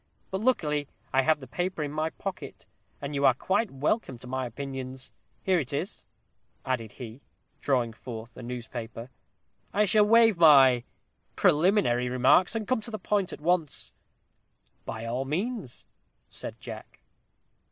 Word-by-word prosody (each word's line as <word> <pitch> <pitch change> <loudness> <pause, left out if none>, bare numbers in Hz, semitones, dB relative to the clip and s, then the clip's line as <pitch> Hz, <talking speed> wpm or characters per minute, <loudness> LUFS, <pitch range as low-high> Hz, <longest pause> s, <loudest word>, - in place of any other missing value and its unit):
But 190 +1 -2
luckily 150 - +1 0.3
I 135 - +5
have 155 +3 +2
the 135 - -9
paper 175 +5 -2
in 145 - -4
my 155 +1 -1
pocket; 195 +2 -7 0.3
and 140 +1 -5
you 140 0 -1
are 130 -3 +6
quite 195 - 0
welcome 135 - -1
to 120 - -12
my 130 0 -2
opinions. 130 +1 -6 0.3
Here 185 -2 +3
it 135 -5 -3
is," 175 +9 -4 0.6
added 115 -5 -2
he, 120 +1 -9 0.4
drawing 125 -5 +1
forth 115 0 -9
a - - -9
newspaper. 120 0 -7 0.6
"I 210 +1 +3
shall 210 +2 +5
waive 225 -2 +6
my 135 -6 +7 0.5
preliminary 150 - +3
remarks, 130 - +4
and 220 -2 -2
come 255 -3 +1
to 215 - -4
the 215 - -4
point 205 -3 0
at - - -8
once." 165 -2 0 0.9
"By 115 0 -5
all 120 +3 -2
means," 185 - -3 0.5
said - - -7
Jack. - - -10
140 Hz, 150 wpm, -28 LUFS, 125-190 Hz, 0.9 s, my